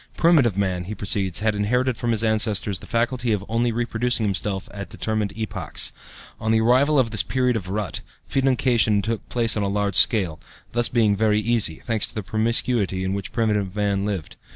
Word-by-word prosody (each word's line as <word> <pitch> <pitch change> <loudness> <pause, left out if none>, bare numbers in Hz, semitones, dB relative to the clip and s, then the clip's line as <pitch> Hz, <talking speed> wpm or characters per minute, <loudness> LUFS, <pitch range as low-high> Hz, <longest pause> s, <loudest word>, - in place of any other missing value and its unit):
"Primitive 145 - +3
man," 95 -3 -1
he 105 +4 -6
proceeds, 100 -2 -1
"had 110 0 +1
inherited 125 +5 0
from 120 +1 -3
his 115 -1 +2
ancestors 110 -3 +1
the - - -13
faculty 120 0 0
of 100 -1 -3
only 115 +2 0
reproducing 120 0 -1
himself 100 -1 -2
at 100 -1 -7
determined 110 -2 -2
epochs. 110 -1 0 0.5
On 110 - -3
the 110 - +3
arrival 130 +6 +3
of 120 -4 +2
this 105 - +4
period 125 -2 0
of 95 -5 -4
rut, 100 -2 -3 0.2
fecundation 125 -6 +1
took 115 +1 -4
place 115 -2 +1
on 105 - -1
a 100 - -1
large 100 0 -1
scale, 95 -10 +4 0.3
this 120 0 +3
being 110 -4 +2
very 105 0 +2
easy, 110 -6 +1
thanks 110 +5 0
to - - -4
the 110 - -4
promiscuity 110 -1 +1
in 95 +1 -2
which 100 0 -4
primitive 105 -4 -1
man 100 -1 0
lived. 100 -6 -4
110 Hz, 190 wpm, -22 LUFS, 100-120 Hz, 0.5 s, this